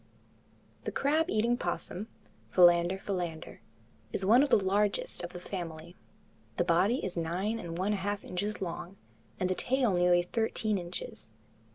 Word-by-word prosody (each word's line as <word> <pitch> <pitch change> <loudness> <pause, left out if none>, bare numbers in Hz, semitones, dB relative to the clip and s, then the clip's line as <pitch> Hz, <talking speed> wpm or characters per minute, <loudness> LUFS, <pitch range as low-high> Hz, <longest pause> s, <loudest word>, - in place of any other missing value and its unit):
The - - -2
crab 310 +4 +1
eating 230 +3 +2
opossum 180 0 -3 0.4
(Philander 175 0 +5
philander) 175 -5 -4 0.5
is 190 - -1
one 230 +6 +6
of 290 - +2
the - - +6
largest 200 0 0
of 175 - -5
the 180 - -7
family. 170 -2 -6 0.6
The - - +3
body 185 +9 +2
is 185 - -4
nine 180 +7 -1
and 170 -4 -6
one 195 +4 +1
half 205 0 -2
inches 200 +3 -3
long, 175 +2 -6 0.4
and 185 - +1
the 185 - +1
tail 250 +1 +1
nearly 175 0 +4
thirteen 220 +1 -1
inches. 175 -10 -7
190 Hz, 150 wpm, -30 LUFS, 175-210 Hz, 0.6 s, one